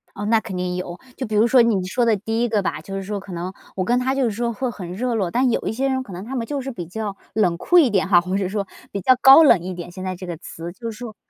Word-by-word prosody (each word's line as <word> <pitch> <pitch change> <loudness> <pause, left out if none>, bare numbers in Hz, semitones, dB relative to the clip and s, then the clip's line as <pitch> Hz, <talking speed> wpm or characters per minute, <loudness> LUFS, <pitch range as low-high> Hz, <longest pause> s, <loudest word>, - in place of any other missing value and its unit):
哦， 205 - -5
那 225 +1 +3
肯 220 -4 -7
定 180 0 -2
有， 180 -1 -5 0.2
就 260 - -4
比 215 - -3
如 215 +2 +5
说 250 +1 +6
你 215 -6 +2
说 245 +6 0
的 225 -2 +3
第 225 +3 -2
一 240 - 0
个 215 -2 +1
吧， 155 - -2
就 195 +4 -7
是 195 - -3
说 205 +1 -4
可 195 0 -11
能 175 +2 -5 0.2
我 185 - -1
跟 245 +4 +2
他 260 +1 0
就 270 - +1
是 230 - 0
说 235 +3 -2
会 255 +3 -2
很 185 -5 -8
热 245 +5 -2
络， 195 -5 0
但 250 +4 +2
有 - - 0
一 - - 0
些 265 +4 0
人 260 0 0
可 210 - -12
能 180 +2 -7
他 265 +4 -5
们 235 -3 -2
就 290 -1 -2
是 270 +1 -5
比 180 -8 -6
较 205 +3 -5 0.2
冷 185 -5 +2
酷 355 - +3
一 310 -7 +6
点 195 -3 +1
哈， 180 -2 +6
或 185 +2 -3
者 195 -2 -1
说， 200 -1 -3 0.2
比 200 - -3
较 255 +8 +5
高 270 +4 +9
冷 270 - +6
一 185 +1 -5
点， 175 0 -8
现 185 +1 -8
在 185 0 -3
这 185 +1 -8
个 175 -2 -5
词。 165 +1 -8
就 230 +3 -6
是 215 - -11
说 235 -2 -8
210 Hz, 350 characters per minute, -22 LUFS, 185-240 Hz, 0.2 s, 高